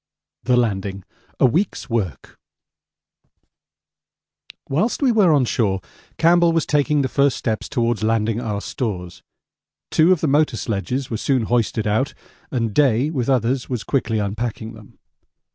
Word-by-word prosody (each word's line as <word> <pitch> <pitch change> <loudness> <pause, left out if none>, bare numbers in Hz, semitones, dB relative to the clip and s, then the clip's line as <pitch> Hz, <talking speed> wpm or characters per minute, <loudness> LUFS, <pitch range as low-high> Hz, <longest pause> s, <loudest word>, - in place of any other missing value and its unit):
The 125 -1 +2
Landing: 100 -4 -1 0.4
A - - +5
Week's 175 - 0
Work 100 - -4 2.3
Whilst 180 - 0
we 260 - +4
were 205 -7 +4
on 140 -4 +3
shore 105 -6 0 0.4
Campbell 170 +1 +4
was 165 -2 +1
taking 150 0 +1
the - - 0
first 140 +2 +1
steps 110 -2 -3
towards 120 -4 0
landing 110 +1 0
our 105 -4 -3
stores. 90 -9 -5 0.7
Two 160 +3 +4
of 185 - +3
the 160 - +1
motor 145 -3 +2
sledges 120 +6 -3
were 110 - -1
soon 130 +1 0
hoisted 115 -1 0
out, 110 +6 0 0.3
and 115 -5 -2
Day 135 +1 +2
with 130 -5 -2
others 125 0 0
was 125 -4 -3
quickly 120 -5 -1
unpacking 110 +2 -3
them. 110 -2 -15
120 Hz, 145 wpm, -21 LUFS, 110-140 Hz, 2.3 s, A